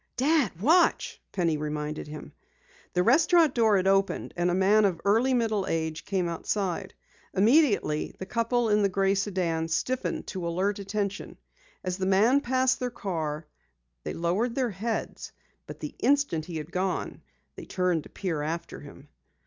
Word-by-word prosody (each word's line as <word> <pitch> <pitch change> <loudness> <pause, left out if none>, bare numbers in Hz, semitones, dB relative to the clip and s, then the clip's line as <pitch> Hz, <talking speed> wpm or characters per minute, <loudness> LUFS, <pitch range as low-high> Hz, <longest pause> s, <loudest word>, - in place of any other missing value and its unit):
"Dad, 265 - +2
watch!" 330 - +2
Penny 170 -5 0
reminded 150 0 -4
him. 150 0 -9 0.6
The 180 - +2
restaurant 310 - +4
door 220 -4 +4
had 185 - 0
opened, 195 0 +1
and 175 0 +1
a 175 - +1
man 200 +3 +4
of 185 -5 +1
early 230 +6 +3
middle 220 -5 0
age 160 -1 -2
came 190 -3 -1
outside. 180 +2 -3 0.4
Immediately 210 - +3
the 190 - -6
couple 230 +3 0
in 210 0 +3
the 200 - +3
gray 195 +1 +2
sedan 180 -5 -1
stiffened 255 +10 -2
to 180 -3 -4
alert 195 +5 -1
attention. 200 0 -4 0.5
As 185 0 -3
the 190 - 0
man 220 +9 +4
passed 260 0 +1
their 250 - -2
car 160 -9 -4 0.6
they - - -4
lowered 190 +9 0
their 255 -4 0
heads, 215 +4 -4 0.3
but - - -9
the - - -5
instant 280 - +1
he 170 -1 -6
had 155 +2 -7
gone 185 0 -1
on, - - -18 0.3
they - - -9
turned 180 -3 0
to - - -14
peer 170 -6 -3
after 165 +3 -4
him. 145 0 -13
195 Hz, 165 wpm, -27 LUFS, 170-230 Hz, 0.6 s, restaurant